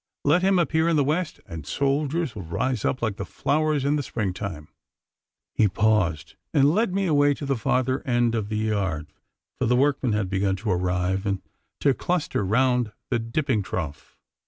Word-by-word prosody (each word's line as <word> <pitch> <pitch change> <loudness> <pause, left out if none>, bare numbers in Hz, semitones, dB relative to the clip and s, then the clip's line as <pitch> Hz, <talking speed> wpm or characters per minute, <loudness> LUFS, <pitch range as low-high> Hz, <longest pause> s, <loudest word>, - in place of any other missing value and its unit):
Let 155 +5 +4
him 190 0 +3
appear 160 0 +2
in 165 - +2
the 145 - +4
West, 155 +4 -1
and 80 -6 -7
soldiers 140 - 0
will 105 - -6
rise 115 +8 -2
up 130 - -1
like 110 -3 -1
the - - -3
flowers 150 +6 0
in 145 +1 +2
the - - 0
spring 110 -8 -2
time.' 85 -6 -6 0.8
He 110 - +4
paused, 95 -7 +1 0.2
and 145 +1 +5
led 220 +1 +2
me 195 +1 0
away 145 -3 +3
to 145 - -6
the 135 0 +1
farther 130 +3 0
end 120 -4 +1
of 110 -3 -2
the 110 - -1
yard, 100 -8 -1 0.5
for - - +1
the 125 - +3
workmen 135 -3 +2
had 105 -2 0
begun 95 +1 0
to 105 +2 -2
arrive 90 +2 0
and 95 -1 -1 0.4
to 140 - +4
cluster 175 - -1
round 125 +2 +2 0.2
the 120 - +2
dipping 115 0 0
trough. 80 -6 -5
120 Hz, 185 wpm, -25 LUFS, 100-145 Hz, 0.8 s, and